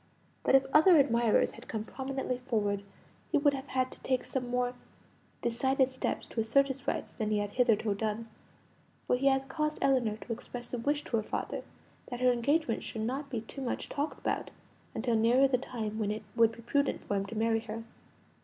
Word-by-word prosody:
But - - +5
if 270 0 +5
other 320 +3 +8
admirers 235 -5 +4
had 235 - -13
come 220 -1 -3
prominently 265 +1 -3
forward, 210 -6 0 0.5
he - - +4
would 285 -1 +4
have 270 0 -5
had 255 0 0
to - - -13
take 255 -2 0
some 250 -2 -2
more 245 0 0 0.7
decided 265 +3 +2
steps 260 - -2
to - - -5
assert 275 +6 +3
his 270 +1 -6
rights - - -2
than 215 -2 -2
he 215 - +2
had 205 0 -1
hitherto 225 -3 +2
done; 215 +2 -2 0.8
for - - +3
he 270 +2 +1
had 270 0 +3
caused 305 +2 -1
Ellinor 240 -6 +2
to 230 - -5
express 240 +1 -8
a 245 - -1
wish 290 +5 0
to 230 - -1
her - - +1
father - - -3 0.5
that 245 - -5
her 255 0 +5
engagement 245 +1 +1
should 220 - -4
not 270 +5 -2
be 235 -4 -2
too 255 +5 -9
much 250 - -3
talked 290 +2 -2
about - - -2 0.5
until 235 0 +1
nearer 240 +5 +5
the 255 -2 +1
time 220 -4 -4
when 210 -2 0
it 215 +1 -3
would 230 -1 +5
be 235 0 -12
prudent 280 +4 0
for - - -2
him 195 0 -1
to 225 - -7
marry 225 0 +2
her. 225 0 -6
245 Hz, 205 wpm, -31 LUFS, 225-270 Hz, 0.8 s, other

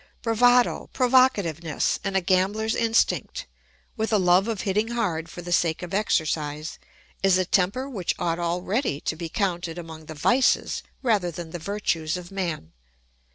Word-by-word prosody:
Bravado, 245 +2 +3
provocativeness, 205 - +2
and 195 -1 0
a - - +2
gambler's 195 +5 +1
instinct, 230 - +1 0.5
with 220 -1 -2
a 215 - +4
love 185 +1 +4
of 225 -4 -2
hitting 210 +3 0
hard 195 -9 -2
for 175 - -9
the 175 - -6
sake 170 -1 +1
of 180 +1 -7
exercise, 155 -6 -1 0.4
is 195 -1 +4
a 185 - +1
temper 195 +9 +1
which 205 -11 -2
ought 170 -1 -1
already 175 - -1
to - - -2
be 165 0 -6
counted 175 -4 -2
among 160 -2 -9
the 155 - -8
vices 250 - +2 0.2
rather 210 -8 +2
than 170 -1 -7
the 175 - -5
virtues 170 -3 -2
of 180 0 -10
man. 170 - -4
185 Hz, 155 wpm, -25 LUFS, 165-220 Hz, 0.5 s, a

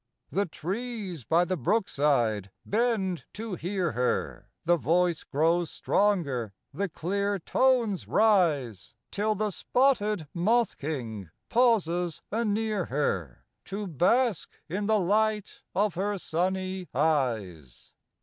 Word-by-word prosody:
" - - -56
The 200 +2 0
trees 190 - -5
by 170 +8 +3
the 185 - -1
brookside 140 - +1 0.2
bend 210 -6 0
to 220 -1 -5
hear 180 -1 -1
her; 125 +2 -2 0.2
The 175 +1 +5
voice 170 +4 +1
grows 165 +3 +1
stronger, 140 - 0 0.2
the 200 0 -2
clear 200 +5 -1
tones 235 0 +1
rise; 160 - +2 0.2
Till 210 +1 0
the 210 0 -1
spotted 215 - +1
moth 220 +7 +2
king 115 - -4 0.2
pauses 180 -9 +2
a 225 +3 0
near 215 -3 0
her 95 - -2 0.2
To 200 +2 -4
bask 200 - +2 0.2
in 200 +5 -2
the 220 -1 +3
light 210 +2 0
of 205 -1 +2
her 200 +3 -1
sunny 185 +2 -2
eyes. 115 - -1
185 Hz, 120 wpm, -28 LUFS, 150-210 Hz, 0.2 s, The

